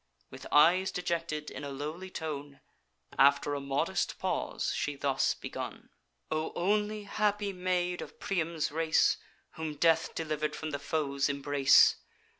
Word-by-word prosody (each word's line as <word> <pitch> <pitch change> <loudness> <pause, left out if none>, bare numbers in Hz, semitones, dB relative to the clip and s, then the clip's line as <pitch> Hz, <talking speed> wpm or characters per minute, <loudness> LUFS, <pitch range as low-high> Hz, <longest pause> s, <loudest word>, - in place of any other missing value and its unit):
With - - -9
eyes 180 +6 +5
dejected, 165 -4 -3
in - - -7
a 140 - -4
lowly 155 +7 -5
tone, 145 -5 -6 0.6
After 140 +1 +5
a 145 - -1
modest 140 0 -1
pause - - -2
she 145 - -2
thus 135 -1 +1
begun: - - -7 0.4
"'O 155 0 -1
only 210 +3 0
happy 205 0 0
maid 180 -1 -1
of - - -10
Priam's 165 -5 -1
race, 160 +1 +3 0.4
Whom 160 -2 -4
death 165 +2 +2
deliver'd 155 -2 -2
from 155 -1 -5
the 140 - -3
foes' 140 -1 -1
embrace! 140 -1 +5
155 Hz, 135 wpm, -30 LUFS, 145-180 Hz, 0.6 s, eyes